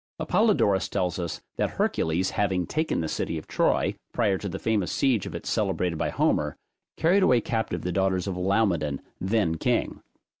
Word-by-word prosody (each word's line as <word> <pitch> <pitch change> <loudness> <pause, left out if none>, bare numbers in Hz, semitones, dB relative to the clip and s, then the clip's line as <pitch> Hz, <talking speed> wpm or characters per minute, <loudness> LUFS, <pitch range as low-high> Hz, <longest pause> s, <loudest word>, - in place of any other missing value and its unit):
Apollodorus 105 - +2
tells 90 -2 -1
us, 85 -2 -4 0.2
that - - +1
Hercules 85 +4 +1
having 95 -3 0
taken 155 - -1
the 80 - -2
city 80 - -2
of 80 - -7
Troy, - - +1 0.2
prior 100 -6 +1
to 100 - -4
the 95 - -4
famous 105 -4 0
siege 125 -8 +1
of - - -7
it - - -6
celebrated 85 -3 0
by - - 0
Homer, - - 0 0.4
carried 180 +5 +3
away 125 -10 +5
captive 110 0 -2
the 90 - -1
daughters 95 0 +1
of 95 -2 -3
Laomedon 90 -7 +1 0.2
then 95 -4 +1
king. - - 0
95 Hz, 175 wpm, -26 LUFS, 90-110 Hz, 0.4 s, away